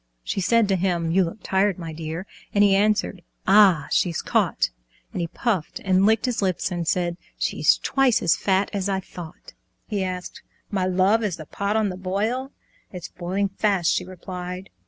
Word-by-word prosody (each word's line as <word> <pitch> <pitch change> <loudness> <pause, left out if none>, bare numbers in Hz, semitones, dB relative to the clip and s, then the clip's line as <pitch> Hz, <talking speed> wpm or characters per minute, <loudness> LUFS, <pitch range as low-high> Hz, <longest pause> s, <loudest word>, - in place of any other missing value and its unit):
She 195 - -2
said 230 +3 +3
to 195 - +2
him, 175 -3 0
"You 190 +2 +4
look 175 +5 -6
tired, 190 0 +1
my 165 -3 -6
dear," 160 +3 -5 0.3
And 205 - +5
he 200 -1 +5
answered, 205 -2 +1 0.3
"Ah, 190 -7 +6
she's 170 -3 +1
caught!" - - +1 0.4
And 180 - -3
he 170 - -1
puffed 190 -2 -2
and 190 +1 +4
licked 220 +2 +3
his 245 -4 -1
lips 190 -1 0
and 175 -2 -3
said 175 -1 0 0.2
"She's - - +2
twice 270 -3 +2
as 170 - +4
fat 195 0 +1
as 200 -1 -1
I 190 -1 0
thought!" 175 -2 -11 0.3
He 205 -3 -2
asked, 180 -1 -5 0.3
"My 190 -3 0
love, 190 +5 +3
is 195 -6 -1
the 155 - -9
pot 200 +6 -2
on 215 -2 +2
the 180 - -6
boil?" 215 +8 -2 0.4
"It's 180 -3 -7
boiling 190 +3 -2
fast," 195 -3 +1
she - - 0
replied. 180 0 -7
190 Hz, 185 wpm, -24 LUFS, 180-205 Hz, 0.4 s, Ah